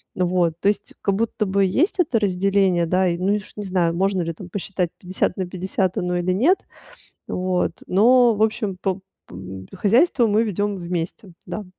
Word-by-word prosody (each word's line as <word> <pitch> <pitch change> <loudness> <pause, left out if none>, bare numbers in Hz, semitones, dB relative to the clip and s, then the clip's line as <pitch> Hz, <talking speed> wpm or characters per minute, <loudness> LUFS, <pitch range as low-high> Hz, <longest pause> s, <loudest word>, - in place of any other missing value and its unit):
вот, 180 -2 +1
то - - 0
есть 210 - -3
как 200 -1 +1
будто 220 0 -1
бы 195 0 +2
есть 330 - +1
это 280 -9 +2
разделение, 195 -2 +2
да, 185 +2 +2
и, 170 -1 0
ну, 195 +3 +2
уж 205 0 -6
не 210 - -4
знаю, 175 -3 +1
можно 190 +1 +1
ли 165 0 -3
там 180 +2 -11
посчитать 185 -2 -3
50 185 0 -2
на 185 - -1
50 185 +1 -2
оно 180 0 -1
или 180 +1 0
нет, 280 - +3 0.7
вот 180 0 -2
но, 235 +4 +5
в 210 - -1
общем, 215 -3 0
по 190 -1 -1 0.3
по 90 - -11 0.4
хозяйство 240 - +3
мы 215 +2 +3
ведём 205 -1 -1
вместе, 175 +1 -5
да. 180 +4 -5
190 Hz, 185 wpm, -22 LUFS, 180-210 Hz, 0.7 s, но